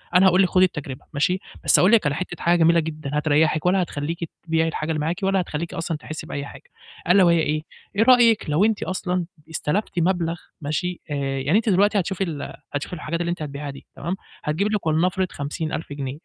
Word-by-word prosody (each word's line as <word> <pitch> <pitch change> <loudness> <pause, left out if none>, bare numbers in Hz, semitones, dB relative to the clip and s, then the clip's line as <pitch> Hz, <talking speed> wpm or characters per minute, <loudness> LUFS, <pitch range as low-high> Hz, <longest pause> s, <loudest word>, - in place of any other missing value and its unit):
أنا 185 +1 +7
هاقول 185 +1 +5
لِك 180 - +2
خدي 185 0 +5
التجربة 145 -7 -6
ماشي، 180 +6 +1 0.2
بس - - +5
أقول 185 +4 +5
لِك 220 -9 +5
على 145 -1 +1
حتّة 180 - -5
حاجة 170 0 +4
جميلة 170 +1 +5
جدًا 155 -3 -4
هتريّحِك 155 +1 +2
ولا 185 +1 +3
هتخلّيكِ 165 +1 -3
تبيعي 165 -1 +1
الحاجة 160 0 -2
اللي 155 - -1
معاكِ 160 +4 -1
ولا 195 -1 +2
هتخلّيكي 165 0 -4
أصلًا 165 -1 -2
تحسّي 155 +1 -8
بأي 140 0 -4
حاجة - - -11 0.5
ألا 190 +1 +7
وهي 170 -1 +5
إيه؟ 155 0 0 0.3
إيه 220 - +4
رأيِك 235 -7 +5
لو 165 +8 +3
أنتِ 220 -2 +1
أصلًا 180 -1 -2 0.2
استلفتِ 170 +4 -1
مبلغ 170 -1 +1 0.3
ماشي، 175 +5 -2
آآ - - 0 0.2
يعني 145 +10 +2
أنتِ 225 -1 +1
دلوقتي 205 +2 +4
هتشوفي 190 +1 -1
ال 155 -5 -5 0.2
هتشوفي 145 +5 -3
الحاجات 165 +2 -3
اللي 170 - -1
أنتِ 175 -2 -3
هتبيعها 145 0 -5
دي 140 - -10
تمام، 175 +5 -3 0.3
هتجيبي 170 +8 0
لِك 200 - -3
ولنفرض 180 +4 +1
50.000 150 +1 -4
جنيه 140 0 -5
165 Hz, 205 wpm, -23 LUFS, 150-185 Hz, 0.5 s, أنا